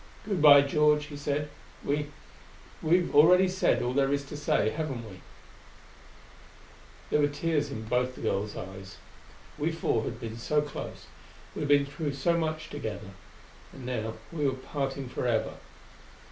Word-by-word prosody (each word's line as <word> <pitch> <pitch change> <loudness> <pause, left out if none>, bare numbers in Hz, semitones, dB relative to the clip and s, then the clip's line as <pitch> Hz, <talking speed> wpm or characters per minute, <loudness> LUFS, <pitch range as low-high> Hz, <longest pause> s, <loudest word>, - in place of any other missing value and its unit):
"Good 200 -6 -1
by, 145 -2 +9
George," 150 +1 +3
he 150 -1 -9
said. 145 +1 -2 0.4
"We 145 +1 0 0.7
we've 175 +2 +3
said - - -14
already 180 +5 +5
all 125 - -1
there 135 0 +2
is 140 0 0
to 145 - -8
say, 145 -6 +1
haven't 135 -7 -4
we?" 95 -3 -12 1.9
There - - +3
were 145 - +4
tears 145 0 -1
in 110 -5 -5
both 125 +3 0
the - - -10
girls' 105 -1 -1
eyes. 95 0 -8 0.6
We 155 +3 +1
four 140 -8 0
had 115 - -5
been 115 -1 -6
so 150 +6 +1
close; 145 -1 -6 0.5
we - - -6
had 145 - -2
been 145 -1 +5
through 145 +1 -4
so 155 +5 +1
much 160 -1 -2
together; 110 -8 -5 0.6
and 130 - -10
now 110 -3 -3 0.2
we 155 -3 -2
were 135 - +1
parting 135 0 -4
forever. 120 -1 -1
145 Hz, 160 wpm, -29 LUFS, 120-150 Hz, 1.9 s, by